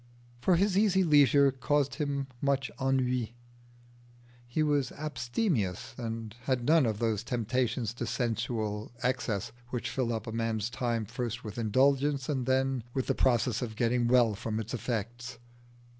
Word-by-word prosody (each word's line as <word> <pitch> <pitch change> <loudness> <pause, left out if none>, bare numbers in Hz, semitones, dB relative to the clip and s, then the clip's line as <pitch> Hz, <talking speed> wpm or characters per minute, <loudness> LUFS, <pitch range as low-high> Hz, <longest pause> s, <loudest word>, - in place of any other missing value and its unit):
For 175 +9 +3
his 195 +2 +3
easy 190 -3 +4
leisure 140 -3 +5
caused 140 +1 0
him 140 -3 -2 0.2
much 140 -1 0
ennui. 125 -3 0 1.1
He 155 +6 0
was 145 -4 +1
abstemious, 145 - -2
and 115 -2 -5
had 130 -3 0
none 155 -3 +5
of 110 -2 -1
those 110 -1 0
temptations 120 -1 -1
to 120 -1 -4
sensual 115 -2 -2
excess 125 -5 -1 0.2
which 125 -2 -3
fill 125 -3 -1
up 110 -1 -3
a 115 - -5
man's 115 -1 -1
time 120 -3 -1
first 120 +2 -4
with 105 +1 -6
indulgence 135 +5 +2
and 130 -4 -1
then 130 -1 +1
with 130 - 0
the - - +1
process 120 -1 +2
of 115 -3 -4
getting 120 +1 +1
well 120 -3 +4
from 110 +1 -3
its 110 - -5
effects. 120 +1 -4
125 Hz, 150 wpm, -30 LUFS, 115-135 Hz, 1.1 s, leisure